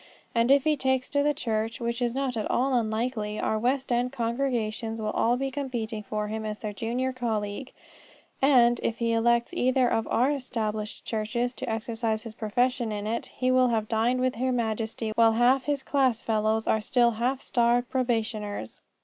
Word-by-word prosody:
And 230 +1 +2
if 275 0 +5
he 310 -1 +3
takes 265 -2 0
to 285 - +1
the 295 0 +2
church, 225 -4 -2
which 235 +1 -2
is 240 0 0
not 270 -2 -1
at 215 - -2
all 265 +2 +1
unlikely, 220 -2 -1
our 220 - 0
West 260 +3 0
end 245 +1 +1
congregations 230 -3 -2
will 215 - -2
all 240 +2 +2
be 270 +1 -2
competing 240 -6 -3
for 210 0 -3
him 220 +1 -4
as 215 -1 -4
their 210 -1 -5
junior 245 +5 -2
colleague; 225 -1 -3 0.7
and, 245 -3 +5
if 230 - -1
he 230 -1 0
elects 235 +5 +2
either 255 -5 +2
of 225 -1 0
our 255 +5 +2
Established 220 -6 -3
churches 235 +3 -2
to - - -5
exercise 225 0 -2
his 225 -2 -8
profession 240 +2 0
in 205 -1 -4
it, 230 +2 -2
he 255 0 -1
will 255 0 +4
have 220 -3 0
dined 235 +3 +1
with 255 -2 0
Her 260 +2 0
Majesty 225 -2 -2
while 225 0 +5
half 240 +3 +4
of - - -22
his 285 -2 -1
class 265 -5 +2
fellows 220 0 0
are 220 - +2
still 240 +2 +3
half 245 +4 -1
starved 240 -1 +1
probationers. 220 - -2
235 Hz, 190 wpm, -27 LUFS, 220-255 Hz, 0.7 s, if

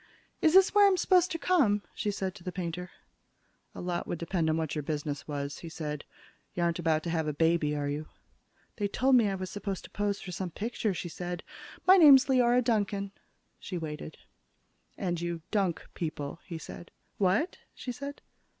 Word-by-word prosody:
"Is 320 +2 +4
this 385 0 +7
where 410 -1 +7
I'm 385 -2 +3
supposed 365 -1 +4
to 330 - -2
come?" 280 - +3
she 210 - -2
said 190 -2 -2
to 180 - -14
the 180 - -4
painter. 180 0 -4 0.9
"A - - -6
lot 175 -1 -2
would - - -2
depend 170 0 -1
on 155 - +2
what 160 -2 -2
your 150 - -1
business 145 -1 -4
was," 140 -1 -4
he 170 - -8
said. 150 -2 -5 0.5
"You 175 - 0
aren't 170 0 +1
about 160 -2 +1
to 170 - -2
have 160 -2 0
a 150 - -1
baby, 160 -1 +2
are 145 -1 -1
you?" 150 +2 -3 0.7
"They 205 -2 0
told 260 +6 +2
me 230 -4 +5
I 195 - -1
was 185 -1 -5
supposed 200 -2 -4
to - - -12
pose 205 -1 -1
for 185 - -7
some 180 +1 -3
picture," 215 +1 -2
she 175 - -4
said. 175 +1 -5 0.4
"My 375 +1 +8
name's 285 -5 +9
Leora 250 -2 +4
Duncan." 205 -4 0 0.5
She 185 - -5
waited. 155 -1 -6 0.8
"And 175 -3 -2
you 170 -2 -3
dunk 195 -6 0
people," 155 -2 -4
he 170 -4 -5
said. 170 +1 -9 0.3
"What?" 200 - +1 0.2
she 250 - -5
said. 280 +3 -7
180 Hz, 195 wpm, -30 LUFS, 160-225 Hz, 0.9 s, name's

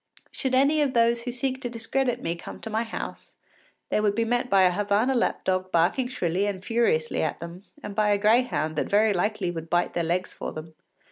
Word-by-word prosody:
Should 265 -2 -1
any 285 +4 +4
of 275 -4 0
those 235 0 +3
who 245 +1 -4
seek 260 +2 -3
to 245 - -3
discredit 245 +2 -2
me 165 +1 -1
come 170 - -9
to 220 - -6
my 220 +1 +1
house, 230 -1 -6 0.5
they - - +1
would 205 -1 +1
be 230 +1 +1
met 245 +2 0
by 195 -3 +5
a 180 - +5
Havana 205 +6 +1
lap 240 - 0
dog 185 0 0
barking 175 +10 +2
shrilly 190 -5 -1
and 190 -2 -4
furiously 225 -10 +1
at 155 - -2
them, 170 +4 -9 0.2
and 205 - -6
by 210 0 +2
a 205 - +3
greyhound 210 -7 +2
that - - -1
very 210 +1 +4
likely 200 0 -1
would 165 -1 -7
bite 175 0 +1
their 170 - 0
legs 175 +3 -1
for - - -5
them. 160 +1 -8
210 Hz, 220 wpm, -26 LUFS, 180-240 Hz, 0.5 s, by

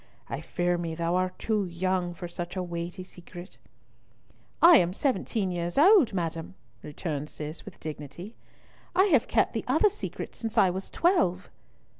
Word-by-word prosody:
I - - -4
fear 175 -1 -1
me 165 -2 -3
thou 170 +1 -1
art 185 0 -1
too 215 -2 0
young 180 0 -1
for 175 0 -6
such 175 +1 -6
a 185 - -2
weighty 175 +1 -5
secret." 175 0 -12 1.0
"I 340 -1 +9
am 175 +1 +2
seventeen 220 -5 -1
years 175 0 -3
old, 345 - +6
madam," 170 -1 -4 0.3
returned 150 -1 -5
Cis, 155 +1 -7
with - - -11
dignity; 155 - -8 0.6
"I 375 - +6
have 260 - +4
kept - - +2
the - - -2
other 420 - +4
secret - - -6
since 225 0 -5
I 190 -4 +5
was 190 +2 -5
twelve." 195 - +1
180 Hz, 160 wpm, -28 LUFS, 170-205 Hz, 1.0 s, I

